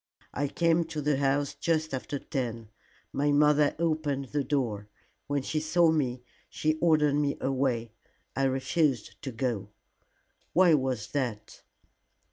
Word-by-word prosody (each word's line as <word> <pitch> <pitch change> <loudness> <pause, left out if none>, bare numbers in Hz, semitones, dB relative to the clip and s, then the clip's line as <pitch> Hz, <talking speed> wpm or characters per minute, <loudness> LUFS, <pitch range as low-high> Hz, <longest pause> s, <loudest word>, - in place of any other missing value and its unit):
I 145 - -1
came 170 +3 +2
to 155 -1 -5
the 150 -1 +1
house 140 +1 +1
just 155 -3 -1
after 135 +2 -3
ten. 120 -6 -4 0.4
My 145 +1 +1
mother 150 0 +4
opened 155 -5 -1
the 145 -1 0
door. 115 -7 -2 0.4
When 145 -2 -1
she 155 - -1
saw 160 +2 +3
me, 130 -5 -1 0.3
she 155 0 0
ordered 155 -3 +3
me 145 -1 0
away. 130 -4 -1 0.4
I 135 - +1
refused 135 -1 0
to 135 - -5
go." 115 -4 -2 0.8
"Why 180 -1 +6
was 130 -7 0
that?" 120 -7 -3
140 Hz, 135 wpm, -28 LUFS, 130-155 Hz, 0.8 s, Why